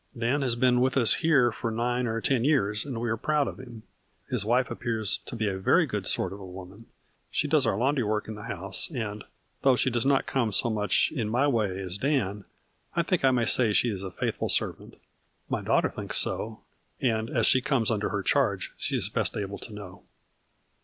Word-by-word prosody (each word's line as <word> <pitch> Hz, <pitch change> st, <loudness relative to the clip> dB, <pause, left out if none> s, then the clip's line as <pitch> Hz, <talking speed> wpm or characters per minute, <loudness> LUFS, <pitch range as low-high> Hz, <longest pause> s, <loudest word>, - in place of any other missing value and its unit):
Dan 120 Hz, +5 st, 0 dB
has 125 Hz, -3 st, +2 dB
been 125 Hz, 0 st, +3 dB
with 130 Hz, +2 st, +1 dB
us 120 Hz, -4 st, +6 dB
here 140 Hz, -8 st, +3 dB
for 115 Hz, +1 st, -4 dB
nine 120 Hz, +2 st, -1 dB
or 115 Hz, 0 st, -2 dB
ten 120 Hz, +2 st, +1 dB
years 110 Hz, -8 st, +1 dB
and 125 Hz, -5 st, -4 dB
we 120 Hz, -, -2 dB
are 115 Hz, 0 st, -1 dB
proud 150 Hz, +4 st, 0 dB
of -, -, -7 dB
him. 120 Hz, -4 st, -11 dB, 0.5 s
His 125 Hz, -6 st, +1 dB
wife 125 Hz, +4 st, +1 dB
appears 115 Hz, -4 st, -1 dB
to -, -, -5 dB
be 110 Hz, -2 st, -1 dB
a 95 Hz, -1 st, -2 dB
very 95 Hz, -, +3 dB
good -, -, -4 dB
sort -, -, 0 dB
of 100 Hz, -, -9 dB
a -, -, -10 dB
woman. 95 Hz, +4 st, -11 dB, 0.4 s
She -, -, 0 dB
does -, -, +2 dB
our 95 Hz, -, 0 dB
laundry 130 Hz, +2 st, +1 dB
work 105 Hz, 0 st, -2 dB
in 110 Hz, -, -5 dB
the 105 Hz, +1 st, -9 dB
house, 95 Hz, -1 st, -1 dB
and, 110 Hz, -8 st, -5 dB, 0.4 s
though 135 Hz, -2 st, +4 dB
she 130 Hz, -, +1 dB
does 120 Hz, -1 st, 0 dB
not 135 Hz, 0 st, +2 dB
come 120 Hz, -5 st, -1 dB
so 115 Hz, +4 st, +3 dB
much 105 Hz, -1 st, +1 dB
in 120 Hz, -9 st, -3 dB
my 125 Hz, +5 st, +2 dB
way 105 Hz, -8 st, 0 dB
as 95 Hz, 0 st, -4 dB
Dan, 105 Hz, -8 st, -1 dB, 0.5 s
I 170 Hz, -, +2 dB
think 180 Hz, -2 st, -1 dB
I 135 Hz, -, +6 dB
may 125 Hz, -3 st, +1 dB
say 115 Hz, -1 st, +4 dB
she 120 Hz, +3 st, +2 dB
is 95 Hz, -3 st, -5 dB
a 95 Hz, -, -5 dB
faithful -, -, -3 dB
servant. -, -, 0 dB, 0.5 s
My -, -, -1 dB
daughter -, -, +1 dB
thinks -, -, -2 dB
so, 110 Hz, 0 st, 0 dB, 0.4 s
and, 110 Hz, -2 st, 0 dB
as -, -, +1 dB
she 130 Hz, -, +6 dB
comes 125 Hz, -4 st, +1 dB
under 105 Hz, -2 st, -1 dB
her -, -, -3 dB
charge, -, -, 0 dB
she -, -, -1 dB
is -, -, +1 dB
best -, -, -1 dB
able 100 Hz, -1 st, -5 dB
to -, -, -8 dB
know." 100 Hz, -2 st, -10 dB
115 Hz, 220 wpm, -27 LUFS, 105-130 Hz, 0.5 s, us